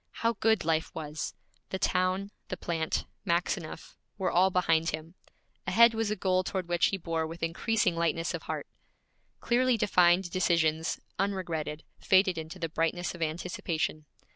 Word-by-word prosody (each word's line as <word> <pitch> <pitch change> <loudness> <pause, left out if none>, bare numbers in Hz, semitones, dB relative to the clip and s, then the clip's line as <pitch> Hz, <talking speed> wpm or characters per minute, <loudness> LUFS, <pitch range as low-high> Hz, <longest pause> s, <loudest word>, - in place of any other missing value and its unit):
How 230 - +4
good 220 -5 +3
life 160 -1 +1
was! 155 -1 -4 0.3
The 190 - -2
town, 185 +2 0 0.2
the 185 - -4
plant, 165 -2 -2 0.2
Maxineff, 170 -1 -2 0.2
were 190 -2 0
all 185 +2 +4
behind 165 -3 +2
him. 155 +2 -5 0.5
Ahead 235 0 +6
was 225 -1 -1
a 210 - 0
goal 185 -1 +1
toward 185 -1 -3
which 175 0 +3
he 195 - -1
bore 165 -2 -2
with 165 +1 -8
increasing 185 +3 +1
lightness 165 0 0
of - - -4
heart. - - -4 0.8
Clearly 250 0 +3
defined 180 -3 +4
decisions, 165 -3 +1 0.2
unregretted, 170 -6 -2 0.2
faded 185 -3 +3
into 160 +3 -7
the 170 -2 -2
brightness 165 +2 -1
of 175 - -10
anticipation. 160 -1 -2
175 Hz, 150 wpm, -29 LUFS, 165-190 Hz, 0.8 s, Ahead